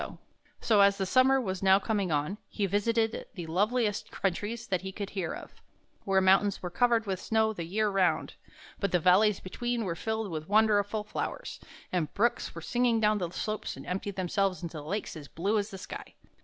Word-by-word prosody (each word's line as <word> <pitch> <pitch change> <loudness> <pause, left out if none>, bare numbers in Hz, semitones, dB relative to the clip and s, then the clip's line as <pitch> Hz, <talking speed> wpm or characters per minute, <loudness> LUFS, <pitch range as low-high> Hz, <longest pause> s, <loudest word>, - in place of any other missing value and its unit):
So, 215 -3 +4
as 200 0 +5
the 195 - -1
summer 260 +6 +4
was 190 -7 -3
now 190 0 +6
coming 200 -3 -1
on, 150 +8 -1
he 205 - -1
visited 220 +3 0
the 175 -3 -5
loveliest 205 +5 0
countries 210 +5 -2
that 185 -3 -1
he 190 0 -5
could 200 +1 -6
hear 185 -5 -2
of, - - -8 0.5
where 195 -1 +3
the 190 - +1
mountains 195 +1 +4
were 180 - -4
covered 230 +3 +2
with 190 -3 -2
snow 220 0 +1
the 170 -5 -5
year 210 +5 0
round, 185 -5 +1 0.5
but 200 -3 0
the 180 - +3
valleys 185 +4 +4
between 240 +5 -3
were 175 - -1
filled 220 +2 -3
with 155 +1 -5
wonderful 210 0 +3
flowers, - - -5 0.3
and 165 -5 -1
brooks 235 +4 0
went - - -7
singing 240 -2 +2
down 210 -1 +3
the 175 -3 -2
slopes 215 +4 -4
and - - -9
emptied 195 +2 -3
themselves 185 -1 0
into 160 -2 -5
lakes 190 +8 -4
as 150 -3 -9
blue 200 +9 0
as 205 +1 -3
the 195 - -8
sky. - - -9
200 Hz, 195 wpm, -29 LUFS, 185-220 Hz, 0.5 s, now